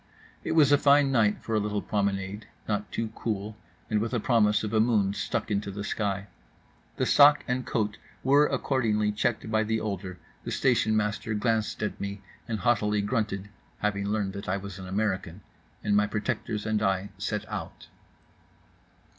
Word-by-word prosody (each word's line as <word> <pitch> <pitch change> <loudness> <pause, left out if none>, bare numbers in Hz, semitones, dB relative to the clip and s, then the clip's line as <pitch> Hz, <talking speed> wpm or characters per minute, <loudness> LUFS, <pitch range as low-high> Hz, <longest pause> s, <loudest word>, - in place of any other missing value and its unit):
It - - -1
was 150 -3 +5
a 145 - +6
fine 140 -1 +5
night 110 -5 +2
for 115 - -4
a 110 - +3
little 105 0 -1
promenade; 100 0 -2 0.2
not 105 -1 -2
too 115 -1 -2
cool, 105 -2 -3 0.3
and 110 -1 +1
with 115 +3 -2
a - - +1
promise 105 -3 +3
of 105 - -3
a 110 - +3
moon 110 -4 +3
stuck 110 +1 -2
into 100 0 -1
the 100 +1 -5
sky. 100 -1 -2 0.7
The - - +1
sac 145 0 +6
and 125 -1 -1
coat 105 -3 -1 0.2
were 145 +3 +5
accordingly 110 -6 +1
checked 110 +1 -1
by 110 0 +3
the 110 +1 0
older; 95 -4 -4 0.3
the - - -5
station 110 -4 +2
master 105 +1 -1
glanced 110 -1 0
at 105 - -3
me 100 0 -5 0.2
and 110 -3 -3
haughtily 105 -4 +2
grunted 100 -3 -2 0.3
(having 100 -1 -1
learned 100 -2 -1
that 100 0 -6
I 95 - +1
was 100 -1 -8
an 95 - -7
American); 95 -2 -2 0.4
and 105 -1 +2
my 105 0 +4
protectors 105 0 -3
and 110 -1 0
I 95 -1 0
set 105 +1 -3
out. - - -7
105 Hz, 175 wpm, -27 LUFS, 100-115 Hz, 0.7 s, a